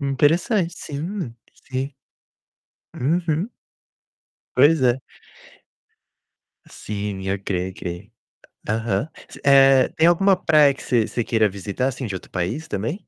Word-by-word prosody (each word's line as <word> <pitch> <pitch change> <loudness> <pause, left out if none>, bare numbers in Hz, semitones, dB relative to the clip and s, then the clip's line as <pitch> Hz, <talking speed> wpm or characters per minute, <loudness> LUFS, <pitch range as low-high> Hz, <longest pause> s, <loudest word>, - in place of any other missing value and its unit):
Interessante, 165 - +2
sim, 155 - -5 0.2
sim. 135 +2 -5 1.0
Uhum. 165 - 0 1.0
Pois 145 +2 +5
é. 125 +1 +3 1.7
Sim, 100 -2 -5
ok, 95 -2 -2
ok. 90 +4 -7 0.6
Aham. 110 +4 -1 0.2
Você - - -13
eh, 135 -2 +6
tem 160 +1 +4
alguma 195 +3 +4
praia 150 -5 +4
que - - -12
você 120 -5 +1
você 120 - -2
queira 110 -3 +2
visitar, 100 +6 -3
assim, 130 0 -4
de 105 - -4
outro - - -9
país 110 - -3
também? 115 - -4
130 Hz, 115 wpm, -22 LUFS, 105-155 Hz, 1.7 s, eh